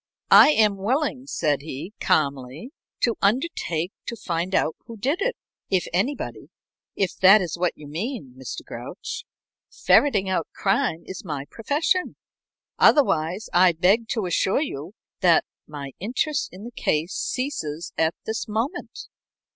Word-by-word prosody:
"I -, -, +9 dB
am 210 Hz, -4 st, +3 dB
willing," 260 Hz, +5 st, -1 dB
said 150 Hz, -, 0 dB
he, 155 Hz, +6 st, -7 dB
calmly, 140 Hz, -, 0 dB, 0.3 s
"to 235 Hz, -2 st, +2 dB
undertake 200 Hz, -, 0 dB, 0.2 s
to 235 Hz, -, -3 dB
find 175 Hz, -2 st, -2 dB
out 160 Hz, -, +1 dB
who 230 Hz, -2 st, -9 dB
did 280 Hz, -, -1 dB
it, -, -, 0 dB, 0.3 s
if 185 Hz, -2 st, +1 dB
anybody, 230 Hz, +11 st, -2 dB, 0.5 s
if 195 Hz, -2 st, 0 dB
that 195 Hz, +3 st, +8 dB
is 180 Hz, -5 st, -3 dB
what 175 Hz, 0 st, 0 dB
you 150 Hz, -, -11 dB
mean, 170 Hz, -, -5 dB
Mr. 130 Hz, 0 st, -7 dB
Grouch. 460 Hz, +1 st, -7 dB, 0.4 s
Ferreting 210 Hz, -10 st, +3 dB
out 185 Hz, -4 st, 0 dB
crime 195 Hz, -4 st, 0 dB
is 190 Hz, -, -7 dB
my 145 Hz, -6 st, -4 dB
profession. 300 Hz, -, 0 dB, 0.6 s
Otherwise, 185 Hz, -, +3 dB
I 180 Hz, 0 st, +6 dB
beg 195 Hz, +8 st, +3 dB
to 220 Hz, -4 st, -1 dB
assure 190 Hz, -, +1 dB
you 165 Hz, -, -6 dB, 0.3 s
that 175 Hz, -4 st, +4 dB, 0.2 s
my 145 Hz, -2 st, -7 dB
interest 260 Hz, -, -1 dB
in 185 Hz, +3 st, -11 dB
the 240 Hz, -, -7 dB
case 160 Hz, -6 st, -1 dB
ceases 175 Hz, -, -3 dB
at 160 Hz, +1 st, +1 dB
this 220 Hz, +1 st, -3 dB
moment." 230 Hz, -, -4 dB
195 Hz, 140 wpm, -24 LUFS, 160-245 Hz, 0.6 s, I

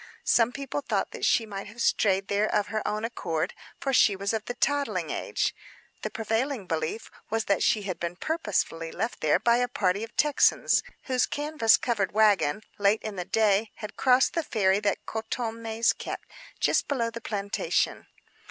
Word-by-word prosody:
Some 235 Hz, 0 st, +4 dB
people 275 Hz, +2 st, -4 dB
thought -, -, -1 dB
she 230 Hz, -, +3 dB
might 200 Hz, -2 st, -6 dB
have 215 Hz, +3 st, -13 dB
strayed 195 Hz, -4 st, +2 dB
there 205 Hz, +1 st, +1 dB
of 210 Hz, -1 st, +1 dB
her 215 Hz, -1 st, -1 dB
own 215 Hz, +1 st, -1 dB
accord, 170 Hz, -9 st, -2 dB, 0.3 s
for 270 Hz, -, -1 dB
she 210 Hz, -5 st, +5 dB
was 200 Hz, +2 st, -2 dB
of 220 Hz, -2 st, -1 dB
the 245 Hz, -, -4 dB
toddling 285 Hz, +3 st, 0 dB
age. -, -, -1 dB, 0.5 s
The -, -, -3 dB
prevailing 225 Hz, +1 st, -2 dB
belief 160 Hz, +6 st, -3 dB, 0.2 s
was 225 Hz, 0 st, -1 dB
that 200 Hz, -, +1 dB
she 210 Hz, -, +2 dB
had 190 Hz, -3 st, -4 dB
been 170 Hz, 0 st, -3 dB
purposely 190 Hz, -, -2 dB
left 225 Hz, 0 st, -4 dB, 0.2 s
by 235 Hz, 0 st, +4 dB
a 245 Hz, 0 st, +1 dB
party 205 Hz, -5 st, 0 dB
of 225 Hz, -, -9 dB
Texans, 295 Hz, -1 st, +3 dB, 0.2 s
whose 255 Hz, -2 st, +1 dB
canvas 290 Hz, -6 st, +3 dB
covered 210 Hz, -7 st, -1 dB
wagon, 210 Hz, -3 st, +3 dB, 0.2 s
late 205 Hz, +2 st, +3 dB
in 215 Hz, -2 st, -5 dB
the 180 Hz, -2 st, -4 dB
day, 215 Hz, 0 st, +2 dB
had 210 Hz, -1 st, -8 dB
crossed 255 Hz, 0 st, +4 dB
the 335 Hz, -, +1 dB
ferry 200 Hz, -9 st, +2 dB
that 205 Hz, -1 st, -1 dB
Coton 225 Hz, +1 st, -3 dB
Maïs 225 Hz, 0 st, +1 dB
kept, -, -, -6 dB, 0.3 s
just -, -, +2 dB
below 235 Hz, -5 st, -1 dB
the 230 Hz, +1 st, -7 dB
plantation. 200 Hz, -2 st, -1 dB
220 Hz, 175 wpm, -27 LUFS, 200-240 Hz, 0.5 s, she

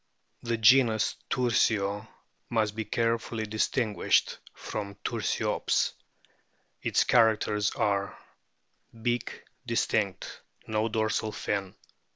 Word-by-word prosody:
The 115 Hz, -1 st, -1 dB
genus 110 Hz, -1 st, +4 dB
TURSIO 110 Hz, -4 st, +1 dB, 0.4 s
must 110 Hz, -3 st, 0 dB
be 110 Hz, -1 st, -3 dB
carefully 115 Hz, -1 st, -1 dB
distinguished 110 Hz, +1 st, +1 dB
from 100 Hz, -2 st, -6 dB
Tur -, -, -2 dB
stops. -, -, 0 dB, 0.9 s
Its -, -, +2 dB
characters 110 Hz, -3 st, +3 dB
are: 100 Hz, -1 st, 0 dB, 0.8 s
Beak 120 Hz, +1 st, -2 dB, 0.2 s
distinct; 105 Hz, -4 st, -1 dB, 0.2 s
no 110 Hz, +1 st, 0 dB
dorsal 110 Hz, 0 st, 0 dB
fin. 100 Hz, -3 st, -3 dB
110 Hz, 90 wpm, -28 LUFS, 105-115 Hz, 0.9 s, genus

